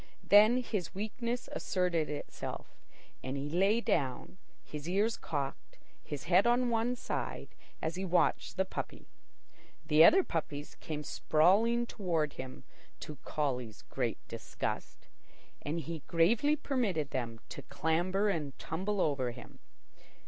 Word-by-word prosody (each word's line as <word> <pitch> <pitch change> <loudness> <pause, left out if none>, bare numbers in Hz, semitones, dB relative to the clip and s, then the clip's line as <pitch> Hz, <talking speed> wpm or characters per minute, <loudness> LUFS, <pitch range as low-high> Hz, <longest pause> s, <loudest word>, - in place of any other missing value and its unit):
Then 215 +5 +6
his 200 -9 -3
weakness 235 +4 -3
asserted 180 -5 0
itself, 150 -1 -5 0.6
and 130 +2 -3
he 140 +1 -3
lay 195 +7 +3
down, 140 - -1 0.2
his 150 +2 -7
ears 210 +5 +2
cocked, 140 -3 -4 0.3
his 145 -3 -6
head 185 +5 +4
on 245 0 +3
one 230 +2 +1
side, - - -4 0.3
as 160 +2 -1
he 190 - -2
watched 180 +1 +1
the 190 - +2
puppy. - - -6 0.8
The 155 0 +6
other 380 - +8
puppies 150 - -4
came 150 -1 -5
sprawling 205 +12 +3
toward 165 -10 -1
him, 130 - -8 0.4
to 150 - -7
Collie's 125 -7 -2
great 125 -4 -2
disgust; - - -5 0.5
and 155 +3 -2
he 165 0 -5
gravely 215 - +3
permitted 220 - -1
them 115 -3 -3
to - - -7
clamber 185 +5 0
and 150 -9 -2
tumble 190 +5 -2
over 135 -4 +1
him. 120 +1 -11
170 Hz, 130 wpm, -32 LUFS, 145-210 Hz, 0.8 s, other